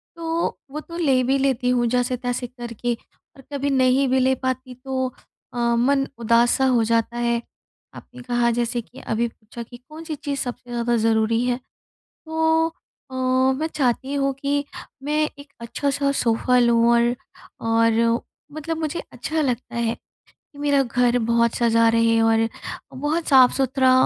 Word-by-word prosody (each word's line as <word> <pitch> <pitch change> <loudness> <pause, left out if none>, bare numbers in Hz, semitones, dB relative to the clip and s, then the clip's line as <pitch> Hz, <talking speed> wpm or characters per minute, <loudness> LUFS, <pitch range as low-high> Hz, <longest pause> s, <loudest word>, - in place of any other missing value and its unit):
तो 330 0 -1 0.2
वो 305 - -4
तो 335 +2 -9
ले 270 -7 +3
भी 270 +2 +2
लेती 265 -2 +1
हूँ 240 -1 +2
जैसे-तैसे 245 0 -1
करके 240 -1 -4 0.4
और 270 - -14
कभी 280 0 -1
नहीं 260 0 +3
भी 260 0 +3
ले 260 +1 +3
पाती 260 0 -2
तो 260 -1 -1 0.5
अ, - - -7 0.2
मन 270 +3 +2
उदास-सा 235 +3 +3
हो 245 -3 +3
जाता 230 +1 0
है। 235 0 0 0.5
आपने 250 0 -12
कहा 240 -1 +1
जैसे 240 0 -1
कि 250 +4 -15
अभी 230 +2 -1
पूछा 230 +1 -10
कि 240 +1 -13
कौन-सी 310 +5 -8
चीज़ 280 -1 -4
सबसे 245 0 -5
ज़्यादा 240 0 0
ज़रूरी 225 +1 +2
है? 245 -1 0 0.7
तो 320 0 +2 0.4
अ, - - -7 0.4
मैं 315 - 0
चाहती 270 -2 -1
हूँ 275 -1 +1
कि 285 0 0 0.4
मैं 300 +2 -1 0.2
एक 285 0 -14
अच्छा-सा 280 +4 -1
सोफ़ा 245 +2 +2
लूँ 235 -1 +4
और 235 +1 +3 0.5
और 230 +1 +3 0.3
मतलब 315 +2 -4
मुझे 315 +1 -3
अच्छा 315 0 -2
लगता 250 -4 -2
है 235 -1 0 0.4
कि 285 - -24
मेरा 285 -1 +3
घर 245 0 +2
बहुत 235 0 +2
सजा 230 -1 +3
रहे 230 0 +3
और 225 0 +3 0.5
बहुत 295 +5 -2
साफ़-सुथरा, 265 0 +4
250 Hz, 155 wpm, -22 LUFS, 235-280 Hz, 0.7 s, लूँ